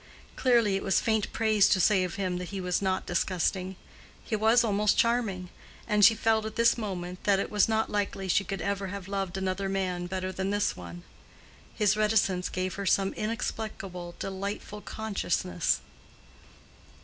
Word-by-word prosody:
Clearly 235 -6 +3
it 195 - -1
was 195 - +2
faint 220 -2 0
praise 215 -3 +3
to 190 - +3
say 185 +1 +4
of 180 -2 -4
him 185 -2 -2
that 180 - -6
he 200 - -5
was 180 0 -1
not 190 -1 0
disgusting: 185 +1 -1 0.5
he 225 - -2
was 220 +3 +4
almost 210 -1 +2
charming; 220 -7 +1 0.4
and 210 -2 +2
she 225 +2 +8
felt 220 0 +2
at 220 0 -6
this 230 0 +4
moment 185 -5 -5
that 200 -2 +4
it - - -3
was 210 0 +3
not 220 0 +1
likely 200 -2 -2
she 195 +2 +3
could 195 0 -4
ever 200 -1 -2
have 195 -1 -6
loved 195 -2 -3
another 190 +1 -2
man 185 -2 -2
better 185 0 -3
than 190 +1 -3
this 205 0 0
one. 85 -1 -9 0.7
His 210 -1 +3
reticence 210 -4 +1
gave 185 0 -2
her - - -4
some 195 0 +2
inexplicable, 215 -5 -4
delightful 200 +2 -5
consciousness. 190 -6 -1
195 Hz, 170 wpm, -28 LUFS, 185-215 Hz, 0.7 s, she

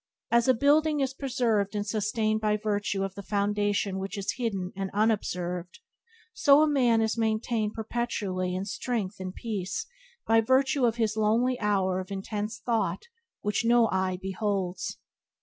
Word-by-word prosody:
As 235 +1 +4
a 260 - +5
building 295 +4 +3
is 270 -1 0
preserved 235 -7 0
and 205 0 -1
sustained 215 +1 0
by 210 -1 +2
virtue 205 -2 -1
of 195 -1 -3
the 200 - -7
foundation 205 -1 0
which 195 +2 -5
is 195 - -2
hidden 195 -7 -2
and 195 0 -3
unobserved, 180 -5 -1 0.6
so 290 -9 +5
a - - +3
man 245 -6 +3
is 220 +1 -1
maintained 220 -1 0
perpetually 210 -5 -2
in 190 +1 -2
strength 210 -1 -3
and 185 0 -6
peace 215 - -3 0.4
by 225 0 +4
virtue 265 +3 +3
of 230 -2 +2
his 220 -2 0
lonely 230 +4 +2
hour 190 -3 +1
of 185 - -6
intense 205 +2 -4
thought 210 -8 -1 0.4
which 210 +2 0
no 235 0 +5
eye 185 -1 0
beholds. 190 -2 -2
215 Hz, 155 wpm, -28 LUFS, 195-235 Hz, 0.6 s, a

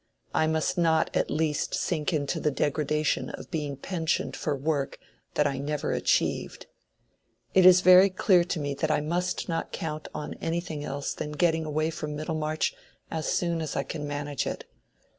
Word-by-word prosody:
I 155 - +3
must 160 +3 0
not 160 -2 +2
at - - +1
least 155 -2 0
sink 155 -2 -1
into 145 -4 -1
the 150 - +1
degradation 150 +1 0
of - - -9
being 150 -5 -3
pensioned 165 +1 -1
for 150 - -1
work 140 0 -1 0.4
that 150 - +3
I 140 -2 0
never 145 +1 -2
achieved. - - 0 0.9
It 185 -1 +7
is 185 0 +8
very 185 +2 +8
clear 185 -1 +4
to 175 -1 -2
me 145 -1 -2
that 155 +3 -1
I 155 - +3
must 175 +4 -1
not 165 -1 -2
count 155 -1 -4
on 150 - -5
anything 165 -2 -3
else 140 0 -3
than 150 - -5
getting 160 0 +2
away 155 +1 0
from 150 -1 -5
Middlemarch 155 0 -1 0.4
as 160 -1 -2
soon 170 -2 0
as 155 - -4
I 140 - 0
can 150 +2 -5
manage 145 0 -3
it. - - -4
155 Hz, 175 wpm, -27 LUFS, 150-165 Hz, 0.9 s, is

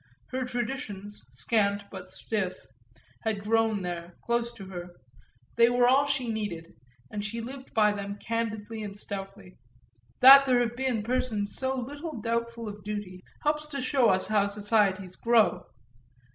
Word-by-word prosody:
Her 260 0 -1
traditions, 230 -5 -4
scant 200 -3 +1
but 185 -2 -8
stiff, 190 -1 -2 0.7
had 215 -3 -1
grown 220 -2 +2
there, 175 -1 -5
close 235 0 0
to 200 -4 -10
her 175 -2 -8 0.6
they 235 0 +7
were 245 0 +4
all 270 +3 +5
she 270 -3 0
needed, 205 -7 -4 0.4
and 205 -1 -3
she 215 +3 -3
lived 260 +3 -8
by 210 -2 +5
them 200 0 -4
candidly 225 0 -3
and 205 -1 -6
stoutly. 195 -2 -8 0.6
That 275 +2 +10
there 250 -2 +4
have 240 -1 -1
been 250 -4 -1
persons 220 -4 -1
so 265 0 -1
little 290 +2 -6
doubtful 230 0 -2
of 205 -1 -8
duty 205 -3 -5 0.2
helps 300 0 0
to 285 -2 -4
show 255 -2 +3
us 185 0 +3
how 205 -2 +3
societies 200 -2 +1
grow. 215 -7 +3
220 Hz, 150 wpm, -28 LUFS, 200-245 Hz, 0.7 s, That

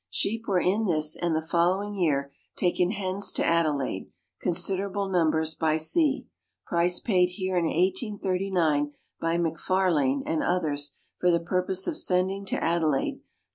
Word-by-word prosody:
Sheep 225 +2 -2
were 190 -3 +2
in 200 +5 +1
this 155 -3 +1
and 170 -2 -1
the 160 - -1
following 180 +5 +1
year 145 -7 0 0.2
taken 180 0 +1
hence 195 -1 -1
to - - 0
Adelaide 150 -11 0 0.3
considerable 195 +3 -1
numbers 160 -3 +1
by 155 -1 +1
sea. 280 - +2 0.4
Price 175 +1 +1
paid 185 -6 +3
here 185 0 -3
in 175 -2 +2
1839 185 - 0 0.3
by 165 +1 0
McFarlane 165 -5 +1
and 160 - 0
others 150 -5 -1 0.3
for 180 - +3
the 170 -1 +4
purpose 185 +2 -1
of - - -2
sending 190 +2 0
to - - -1
Adelaide, 160 -5 +1
27s. - - -31
175 Hz, 145 wpm, -27 LUFS, 160-190 Hz, 0.4 s, the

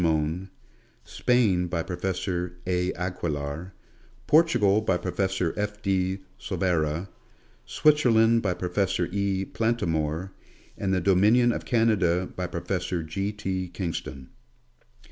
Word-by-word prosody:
Mohn; 80 +3 0 0.5
Spain 105 -8 +2
by 85 -1 -2
Professor 90 -1 -3
A. 90 0 0
Aquilar; 85 -2 -4 0.5
Portugal 120 -11 +4
by 95 -4 +1
Professor 95 -1 -1
F. 105 0 -3
de 95 -1 0 0.2
Silveira; 85 -1 -1 0.6
Switzerland 115 -7 +4
by 90 -4 0
Professor 90 0 0
E. 100 -1 0
Plantamour; 85 -7 -1 0.4
and 95 - -2
the 95 -1 +1
dominion 105 +7 +4
of - - -4
Canada 95 -7 +2
by 90 -1 -2
Professor 90 0 -3
G. 95 +6 -3
T. 95 -3 -3
Kingston. 85 -7 -5
95 Hz, 105 wpm, -26 LUFS, 85-105 Hz, 0.6 s, Portugal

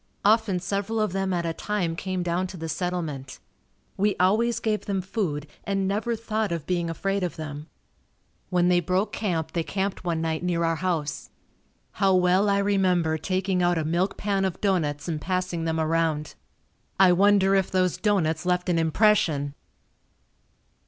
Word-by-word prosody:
Often 210 -4 +3
several 200 +4 -2
of 215 -3 +1
them 195 0 -1
at 175 -2 -1
a 165 - -1
time 180 -3 -2
came 185 +1 -3
down 175 +2 -1
to 185 - -9
the 165 0 -5
settlement. 160 -5 -3 0.6
We 205 +1 +2
always 220 +6 +2
gave 215 -1 -1
them 195 -2 0
food 180 -6 -2 0.2
and 195 -1 -1
never 215 +4 -1
thought 220 -2 -2
of 165 -3 -3
being 175 -2 -1
afraid 195 +4 -1
of 180 -2 -2
them. 150 -1 -7 0.8
When 180 -1 +2
they 180 0 +4
broke 185 +4 0
camp 170 -7 -2
they 170 - 0
camped 195 +3 -3
one 170 -2 -1
night 160 -1 -1
near 175 -1 0
our 165 -1 +1
house. 160 -5 -2 0.6
How 195 -2 +2
well 185 +3 +3
I 200 - +3
remember 185 -5 +2
taking 185 +2 0
out 175 -1 +2
a 160 - -1
milk 175 +5 0
pan 200 -1 0
of 190 -2 -2
doughnuts 170 -8 0
and 155 -3 -3
passing 180 -1 -2
them 160 0 -1
around. 160 -1 0 0.7
I 190 -2 +7
wonder 195 +1 +4
if 195 -1 +2
those 185 -2 +1
doughnuts 165 -7 +1
left 180 0 0
an 170 -2 +2
impression! 160 -5 +2
180 Hz, 170 wpm, -25 LUFS, 165-195 Hz, 0.8 s, I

